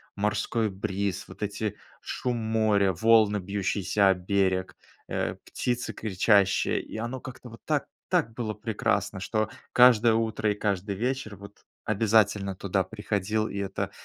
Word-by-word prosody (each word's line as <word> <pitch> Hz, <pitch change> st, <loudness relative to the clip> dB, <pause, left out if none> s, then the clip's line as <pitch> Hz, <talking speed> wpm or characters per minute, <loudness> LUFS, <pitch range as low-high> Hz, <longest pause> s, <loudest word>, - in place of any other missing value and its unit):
морской 105 Hz, +2 st, 0 dB
бриз, 100 Hz, 0 st, -3 dB
вот -, -, -13 dB
эти 105 Hz, 0 st, -3 dB, 0.2 s
шум 125 Hz, -1 st, -3 dB
моря, 110 Hz, -3 st, +2 dB
волны, 110 Hz, +1 st, +4 dB
бьющиеся 100 Hz, +1 st, +1 dB
о -, -, +6 dB
берег, 95 Hz, 0 st, 0 dB, 0.3 s
э, -, -, -2 dB
птицы 120 Hz, -1 st, -2 dB
кричащие, 100 Hz, -1 st, +2 dB
и -, -, -9 dB
оно 120 Hz, +3 st, -4 dB
как-то 125 Hz, -1 st, -10 dB
вот 115 Hz, -, -13 dB
так -, -, 0 dB, 0.2 s
так 115 Hz, -, +1 dB
было 110 Hz, -3 st, -3 dB
прекрасно, 100 Hz, -2 st, -1 dB
что 110 Hz, +1 st, -1 dB, 0.2 s
каждое 120 Hz, -2 st, +6 dB
утро 110 Hz, -1 st, 0 dB
и -, -, -2 dB
каждый 100 Hz, -1 st, -2 dB
вечер 125 Hz, 0 st, -2 dB
вот 100 Hz, +2 st, -14 dB, 0.2 s
обязательно 105 Hz, -2 st, +2 dB
туда 95 Hz, 0 st, 0 dB
приходил, 105 Hz, +1 st, -2 dB
и -, -, -6 dB
это 100 Hz, -1 st, -3 dB
105 Hz, 140 wpm, -27 LUFS, 100-110 Hz, 0.3 s, о